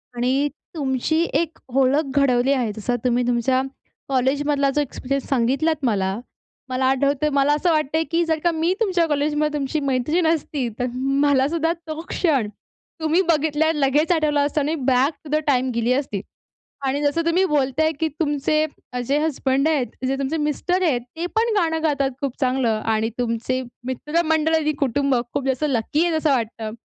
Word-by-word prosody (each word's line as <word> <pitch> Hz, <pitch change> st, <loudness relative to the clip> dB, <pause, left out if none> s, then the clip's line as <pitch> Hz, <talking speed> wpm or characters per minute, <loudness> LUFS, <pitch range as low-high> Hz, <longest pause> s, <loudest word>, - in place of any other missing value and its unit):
आणि 260 Hz, +4 st, +1 dB, 0.3 s
तुमची 285 Hz, +2 st, 0 dB, 0.2 s
एक 325 Hz, -1 st, -5 dB, 0.2 s
ओळख 270 Hz, +3 st, +3 dB
घडवली 265 Hz, -1 st, +3 dB
आहे. 245 Hz, -6 st, 0 dB
जसं 230 Hz, +4 st, -2 dB
तुम्ही 245 Hz, 0 st, +2 dB
तुमच्या 245 Hz, +2 st, +2 dB, 0.5 s
कॉलेजमधला 280 Hz, +2 st, +1 dB
जो 295 Hz, -, +3 dB
एक्सपिरियन्स 275 Hz, 0 st, -3 dB
सांगितलात 275 Hz, +4 st, +1 dB
मला. 195 Hz, -2 st, 0 dB, 0.5 s
मला 255 Hz, +1 st, 0 dB
आठवतं 280 Hz, +2 st, +2 dB
मला 280 Hz, +1 st, +3 dB
असं 335 Hz, +3 st, +1 dB
वाटतं 310 Hz, 0 st, +1 dB
आहे, 320 Hz, -, +2 dB
की 340 Hz, +1 st, +2 dB
जर 320 Hz, -1 st, 0 dB
का 345 Hz, -, +3 dB
मी 330 Hz, +2 st, +1 dB
तुमच्या 360 Hz, -6 st, +2 dB
कॉलेजमध्ये 295 Hz, 0 st, 0 dB
तुमची 275 Hz, +3 st, -1 dB
मैत्रीण 280 Hz, +5 st, +1 dB
असती, 295 Hz, -5 st, 0 dB
तर 250 Hz, -, +1 dB
मलासुद्धा 285 Hz, +4 st, +1 dB
तो 310 Hz, 0 st, -5 dB
क्षण 275 Hz, -, +1 dB, 0.5 s
तुम्ही 315 Hz, +4 st, +3 dB
बघितल्या 315 Hz, 0 st, +2 dB
लगेच 295 Hz, +3 st, +2 dB
आठवला 305 Hz, -3 st, +2 dB
असता 290 Hz, +1 st, 0 dB
आणि 300 Hz, +3 st, 0 dB
बॅक 265 Hz, +1 st, +2 dB
टू 300 Hz, -, -11 dB
द -, -, +3 dB
टाईम 260 Hz, -2 st, +2 dB
गेली 235 Hz, +2 st, +2 dB
असती. 255 Hz, -8 st, -2 dB, 0.6 s
आणि 275 Hz, +2 st, 0 dB
जसं 290 Hz, +3 st, +1 dB
तुम्ही 345 Hz, +3 st, +3 dB
बोलत 275 Hz, -4 st, 0 dB
आहे 315 Hz, -, +3 dB
की 320 Hz, -, +1 dB
तुमचे 305 Hz, 0 st, +1 dB, 0.4 s
जे 280 Hz, +3 st, +1 dB
हसबंड 275 Hz, -2 st, +1 dB
आहेत, 290 Hz, -6 st, +2 dB, 0.2 s
जे 270 Hz, -, 0 dB
तुमचे 275 Hz, +4 st, -2 dB
मिस्टर 315 Hz, +5 st, 0 dB
आहेत, 265 Hz, -8 st, +2 dB
ते 335 Hz, +2 st, -3 dB
पण 455 Hz, 0 st, +2 dB
गाणं 320 Hz, -4 st, +1 dB
गातात 280 Hz, -3 st, +1 dB
खूप 275 Hz, -3 st, -2 dB
चांगलं 255 Hz, -2 st, +1 dB, 0.2 s
आणि 220 Hz, +1 st, 0 dB
तुमचे 245 Hz, +2 st, -1 dB, 0.3 s
मित्रमंडळ 315 Hz, +4 st, +1 dB
आणि 305 Hz, -1 st, +1 dB
कुटुंब 275 Hz, 0 st, +1 dB, 0.2 s
खूप 280 Hz, -2 st, -2 dB
जास्त 265 Hz, +2 st, 0 dB
लकी 280 Hz, +6 st, +1 dB
आहे 335 Hz, -, 0 dB
असं 315 Hz, -1 st, +1 dB
वाटतं. 225 Hz, -3 st, -2 dB
285 Hz, 170 wpm, -22 LUFS, 260-315 Hz, 0.6 s, ओळख